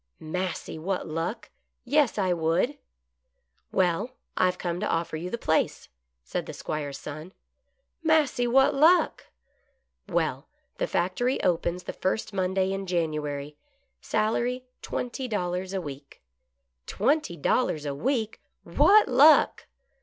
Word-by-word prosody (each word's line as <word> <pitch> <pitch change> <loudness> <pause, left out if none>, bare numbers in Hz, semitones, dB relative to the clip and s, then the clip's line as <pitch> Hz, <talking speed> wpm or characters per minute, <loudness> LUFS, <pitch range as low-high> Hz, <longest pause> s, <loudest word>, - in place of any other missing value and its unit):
"Massy, 180 0 -4
what 185 +3 -2
luck! 170 +8 -4 0.3
Yes, 285 -2 +2
I 185 -3 +2
would." 175 - 0 0.5
" 65 0 -47
Well, 190 +8 0 0.2
I - - +3
have 180 0 +1
come 175 -1 -3
to 210 - -1
offer 165 -1 -1
you 170 +3 -4
the 235 - -3
place," 160 -8 0 0.3
said 65 - -4
the - - -6
'Squire's 145 -2 -4
son. 155 +7 -8 0.3
" - - -48
Massy, 305 -6 +3
what 270 +4 +4
luck! 320 +6 +4 0.3
" - - -44
" - - -28
Well, - - -1 0.3
the - - 0
factory 215 - 0
opens 175 +1 0
the - - -6
first 215 +3 -2
Monday 190 0 0
in 195 0 -4
January. 150 -4 -2 0.4
Salary 240 +4 0 0.2
twenty 255 +1 -4
dollars 185 -3 -2
a 195 - -1
week." 140 -4 -9 0.3
" 60 0 -52
Twenty 260 - +1
dollars 155 - +1
a 140 - -2
week. 225 - -1 0.2
What 315 - +5
luck 280 +5 +5
185 Hz, 140 wpm, -27 LUFS, 165-250 Hz, 0.5 s, What